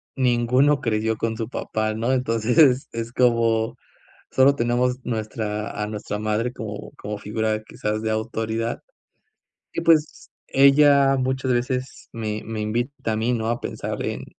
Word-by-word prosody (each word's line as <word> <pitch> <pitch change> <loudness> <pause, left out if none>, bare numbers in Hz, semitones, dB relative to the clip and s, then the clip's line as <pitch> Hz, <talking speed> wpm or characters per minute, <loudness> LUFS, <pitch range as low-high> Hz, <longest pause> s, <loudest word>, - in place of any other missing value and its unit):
ninguno 130 +3 +3
creció 110 -3 0
con 115 0 -2
su 110 0 -4
papá, 110 -3 -2
¿no? 115 +3 0
Entonces, 125 +3 +3
es 115 0 -5
como, 115 -3 +2 0.6
sólo 135 +1 +5
tenemos 125 +1 0
nuestra, 110 -2 -3
a - - -1
nuestra 105 -1 -5
madre 110 +3 -1
como 105 -3 -7
como 105 0 -5
figura 110 +1 -2
quizás 105 0 -3
de 110 0 -2
autoridad, 110 +1 -2 0.9
y - - -3
pues 160 -2 +2 0.2
ella 140 0 +5
muchas 130 0 0
veces 125 +2 -2
me 110 -2 -4
me 115 -1 -5
invita 115 +3 -2
a - - -1
mí, 115 +3 0
¿no? 110 -1 -2
A 120 - -2
pensar - - -4
en - - -3
115 Hz, 145 wpm, -23 LUFS, 110-130 Hz, 0.9 s, sólo